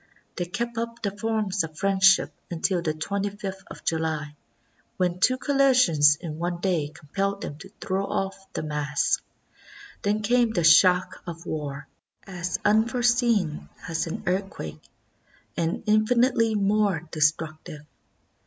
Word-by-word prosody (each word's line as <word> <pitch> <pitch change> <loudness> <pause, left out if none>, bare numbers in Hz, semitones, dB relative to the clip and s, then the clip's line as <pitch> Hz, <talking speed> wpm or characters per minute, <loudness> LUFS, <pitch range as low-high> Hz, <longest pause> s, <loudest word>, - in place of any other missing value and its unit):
They 175 - -2
kept 235 +5 -3
up 230 0 -5
the 200 - 0
forms 210 -3 -1
of 155 -1 -8
friendship 195 0 +4 0.2
until 175 +1 0
the 155 -2 -2
25 200 +5 -3
th 195 -1 -6
of - - -11
July, 160 -2 -2 0.6
when 180 -1 0
two 255 +7 +3
collisions 255 - +4
in 160 -2 -7
one 175 0 -2
day 175 -6 0
compelled 195 +7 -3
them 145 - -6
to 190 - -11
throw 195 +1 -1
off 195 0 -4
the - - -3
mask. 150 -1 0 0.8
Then 210 +1 0
came 240 0 +2
the 175 - 0
shock 180 +3 +5
of 170 -1 -7
war, 145 -2 -5 0.4
as 180 -2 -3
unforeseen 230 -5 +2 0.2
as 165 0 -2
an 165 - -5
earthquake, 180 - -3 0.7
and 165 0 -1
infinitely 225 +1 +3
more 200 -4 +1
destructive. 155 -1 -1
190 Hz, 135 wpm, -25 LUFS, 160-215 Hz, 0.8 s, shock